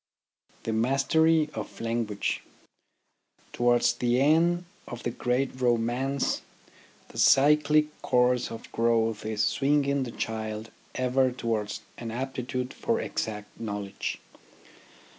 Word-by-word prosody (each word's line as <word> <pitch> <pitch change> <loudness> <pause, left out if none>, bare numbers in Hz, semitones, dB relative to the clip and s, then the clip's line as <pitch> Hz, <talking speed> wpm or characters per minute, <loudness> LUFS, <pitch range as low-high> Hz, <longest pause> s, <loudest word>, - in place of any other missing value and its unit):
THE 115 - -2
MASTERY 150 +7 +3
OF 110 - -7
LANGUAGE 115 -3 -1 1.1
Towards 120 0 +3
the 120 0 +1
end 170 +5 +3 0.2
of 120 0 -7
the 120 - -1
great 130 +2 -1
romance 125 +3 +1 0.7
the - - -8
cyclic 150 +2 +4
course 125 0 +2
of 115 -1 -9
growth 115 -2 +1
is 105 -1 0
swinging 140 +1 +2
the 130 - -3
child 110 -1 -4 0.2
ever 130 0 +2
towards 115 -4 -2 0.2
an 115 - -5
aptitude 125 +1 -3
for - - -1
exact 105 -1 -4
knowledge. 100 -3 -4
120 Hz, 105 wpm, -27 LUFS, 115-135 Hz, 1.1 s, cyclic